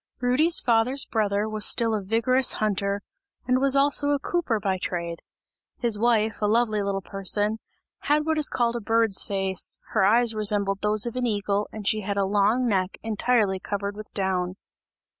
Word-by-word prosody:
Rudy's 265 +7 +3
father's 245 +3 +2
brother 210 -1 -1
was 215 -1 -1
still 230 +1 +3
a 215 - -1
vigorous 230 +6 +1
hunter 200 -1 -2 0.4
and 255 0 +2
was 275 0 +3
also 285 +1 +3
a 290 - +2
cooper 280 -6 -2
by 190 -2 -2
trade; 170 -2 -4 0.6
his 230 -4 0
wife, 220 -2 +1
a 210 - +1
lively 215 -1 +1
little 200 -1 -3
person, 205 +3 0 0.4
had 300 +1 0
what 320 -1 0
is 300 - +2
called 240 -1 0
a 235 - -3
bird's 225 -2 +2
face; 195 -2 -2
her - - +1
eyes 230 +3 +3
resembled 205 -2 0
those 210 +1 +1
of 235 - -5
an 250 -1 -1
eagle 205 -1 -1
and 210 -2 -7
she 215 -1 +1
had 200 0 -4
a 200 - +1
long 210 +5 +1
neck 190 -3 -1
entirely 220 -3 0
covered 200 +1 -4
with 215 0 -10
down. 185 -2 -1
215 Hz, 180 wpm, -25 LUFS, 200-240 Hz, 0.6 s, Rudy's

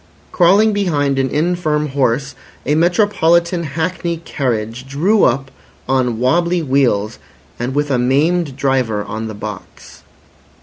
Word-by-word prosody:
Crawling 200 +5 +4
behind 145 -9 0
an 130 0 0
infirm 155 -1 0
horse, 135 0 0 0.3
a 150 - +1
metropolitan 170 0 +2
hackney 170 +3 -3
carriage 125 -6 -3
drew 180 +10 +2
up 135 +2 0 0.4
on 125 -3 0
wobbly 170 +7 +1
wheels 130 -7 0 0.4
and 125 +3 -3
with 145 0 0
a 130 - +1
maimed 145 +4 +1
driver 130 -6 0
on 110 +2 -5
the 110 - -7
box. 105 -2 -9
140 Hz, 125 wpm, -17 LUFS, 125-170 Hz, 0.4 s, Crawling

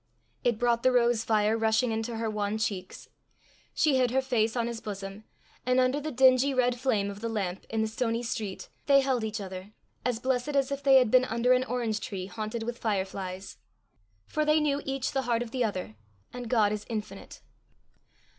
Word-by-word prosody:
It 240 -4 +2
brought 235 0 +2
the 255 - +4
rose 240 -2 +3
fire 215 -1 +2
rushing 225 +2 +2
into 225 +1 -2
her 225 0 -2
wan 210 0 -1
cheeks; 195 -4 -4 0.6
she 290 -4 +2
hid 250 -1 +3
her 260 +2 +2
face 230 -4 +1
on 235 -2 0
his 235 -1 -4
bosom; 195 0 -7 0.4
and, 255 +1 +2
under 255 +3 +2
the 305 +1 -4
dingy 260 +1 +4
red 250 -1 +2
flame 215 -6 0
of 200 +1 -10
the 230 - -2
lamp 195 -4 -3
in 220 0 0
the - - 0
stony 230 +1 -1
street, 215 -5 -4 0.2
they 275 -1 +6
held 260 -4 0
each 220 0 -3
other, 190 +1 -8 0.3
as 250 -2 0
blessed 260 +3 -1
as 275 0 +2
if 280 0 -3
they 275 -1 +5
had 250 -4 +5
been 255 0 +5
under 235 +2 +2
an 255 0 +2
orange 235 -4 -1
tree 190 -2 -5
haunted 215 +3 -5
with 240 +1 -5
fire 205 -4 0
flies. 190 0 -7 0.7
For 305 - -1
they 305 +1 +4
knew 290 -1 0
each 270 -1 -2
the 270 - 0
heart 235 0 +2
of 230 - -10
the 255 -1 0
other, 185 - -3 0.4
and 245 -2 -6
God 215 -4 +3
is 210 0 -3
infinite. 215 -2 -6
230 Hz, 200 wpm, -28 LUFS, 215-255 Hz, 0.7 s, they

